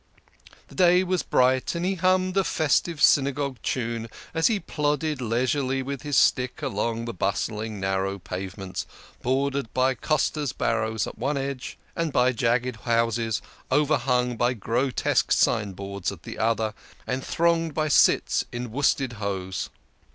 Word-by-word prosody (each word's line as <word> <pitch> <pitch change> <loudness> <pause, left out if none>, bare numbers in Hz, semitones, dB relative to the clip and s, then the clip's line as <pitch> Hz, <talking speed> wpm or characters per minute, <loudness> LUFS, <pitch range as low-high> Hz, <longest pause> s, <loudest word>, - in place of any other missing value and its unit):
The - - -14
day 180 0 +5
was 185 -1 0
bright, 130 +4 +2
and 170 +1 -1
he 190 - +1
hummed 185 0 +2
a 195 - +3
festive 160 -1 +1
Synagogue 140 -1 +3
tune 115 -2 -2 0.2
as 160 0 +3
he 220 -3 +1
plodded 150 -3 -1
leisurely 130 +3 0
with 140 -1 -5
his 145 -2 -1
stick 125 0 +2
along 115 +3 -1
the 115 - -4
bustling, 105 +3 -2
narrow 95 0 -1
pavements, 95 +1 -6 0.3
bordered 135 -1 0
by 130 +1 +3
costers' 150 0 0
barrows 110 0 0
at - - -9
one 140 +4 0
edge, 135 -1 -4 0.2
and 165 -2 -1
by 125 -1 +3
jagged 120 0 0
houses, 115 -1 0 0.3
over 150 +1 +3
hung 125 -2 0
by 120 +2 +1
grotesque 120 +5 0
signboards, 100 -1 0
at 90 -4 -11
the - - -8
other, 110 -1 +1 0.3
and 130 +1 -2
thronged 165 -2 +1
by 155 0 +1
cits 145 - +4
in 120 -1 -5
worsted 135 -1 +1
hose. 95 -2 -3
125 Hz, 145 wpm, -25 LUFS, 110-145 Hz, 0.3 s, day